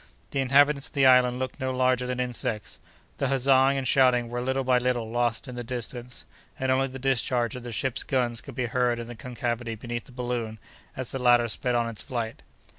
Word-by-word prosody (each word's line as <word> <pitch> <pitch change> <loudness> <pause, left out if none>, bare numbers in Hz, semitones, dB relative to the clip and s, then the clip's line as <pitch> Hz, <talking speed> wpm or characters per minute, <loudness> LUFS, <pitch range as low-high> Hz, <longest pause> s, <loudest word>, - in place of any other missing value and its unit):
The 140 - -1
inhabitants 140 +2 +4
of - - -11
the 140 -2 +3
island 125 -1 +5
looked 130 0 -4
no 130 0 -1
larger 130 -1 +1
than 125 0 -3
insects. 120 -4 -2 0.4
The 140 - 0
huzzaing 135 0 +4
and 135 -1 -2
shouting 125 -3 +4
were 120 +1 -3
little 130 +2 0
by 125 -1 +3
little 120 -3 -1
lost 120 +2 0
in 125 - -7
the 120 0 -5
distance, 120 +1 -4 0.3
and 130 0 +1
only 135 +1 +2
the 135 0 -8
discharge 125 -3 0
of 125 - -6
the 120 0 -7
ship's 130 +3 -1
guns 120 -4 0
could 140 - -11
be 125 -2 -1
heard 120 0 +1
in 115 - -5
the 120 - -8
concavity 120 0 -4
beneath 120 +1 -5
the - - -15
balloon, 120 -3 -3 0.4
as 130 -2 -3
the 135 - -3
latter 120 -1 +5
sped 125 +2 -1
on 120 -1 +1
its 115 -2 -5
flight. 115 -3 -4
125 Hz, 215 wpm, -26 LUFS, 120-130 Hz, 0.4 s, island